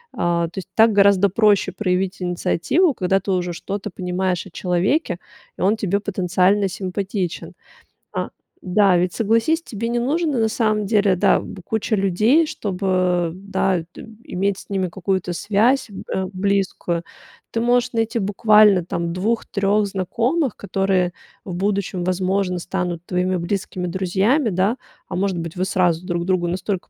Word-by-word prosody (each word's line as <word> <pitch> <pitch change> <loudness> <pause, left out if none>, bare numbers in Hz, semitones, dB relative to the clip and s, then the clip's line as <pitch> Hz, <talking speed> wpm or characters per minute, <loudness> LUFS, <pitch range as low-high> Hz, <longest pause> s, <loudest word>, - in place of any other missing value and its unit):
А, 170 -1 +1
то 190 - -18
есть - - -9
так 225 -1 +5
гораздо 200 -1 +5
проще 205 +1 +3
проявить 185 -2 -1
инициативу, 180 - +1
когда 190 -1 +1
ты 195 +1 -4
уже 180 -1 -1
что-то 200 +4 -5
понимаешь 180 0 -2
о 190 - -12
человеке, 180 - 0 0.4
и - - -8
он 205 +4 +3
тебе 200 -1 0
потенциально 195 0 +1
симпатичен. 190 -1 -4 0.6
А - - -2 0.3
да, 185 0 +3
ведь 180 0 0
согласись, 230 +9 +1
тебе 230 -5 -5
не 240 0 0
нужно 295 +1 0
на 225 - +3
самом 215 -3 0
деле, 205 -3 +3
да, 180 - +3
б 185 - -9
куча 220 +2 -1
людей, 215 - +3
чтобы, 185 - 0
да, 190 -2 -1
д - - -10 0.2
иметь 195 +1 -1
с - - -13
ними 190 -2 0
какую-то 185 0 -2
связь, 220 +9 +1
э, 190 -1 -4
близкую. 185 -3 -1 0.5
Ты 230 - -1
можешь 245 +1 +2
найти 225 +1 0
буквально 210 -2 +4
там 170 -1 -3
2-3 205 +1 0
знакомых, 230 - -1
которые 195 -3 0 0.3
в 185 - -5
будущем, 195 -1 -1
возможно, 185 0 0
станут 175 -1 -3
твоими 180 +1 0
близкими 180 0 -3
друзьями, 195 - +1
да? 195 +6 +1 0.3
А - - -5
может 190 -1 0
быть, 165 0 -5
вы 180 - -1
сразу 180 -3 +1
друг 175 -2 -2
другу 185 -2 +1
настолько 185 +2 -3
195 Hz, 150 wpm, -21 LUFS, 180-210 Hz, 0.6 s, так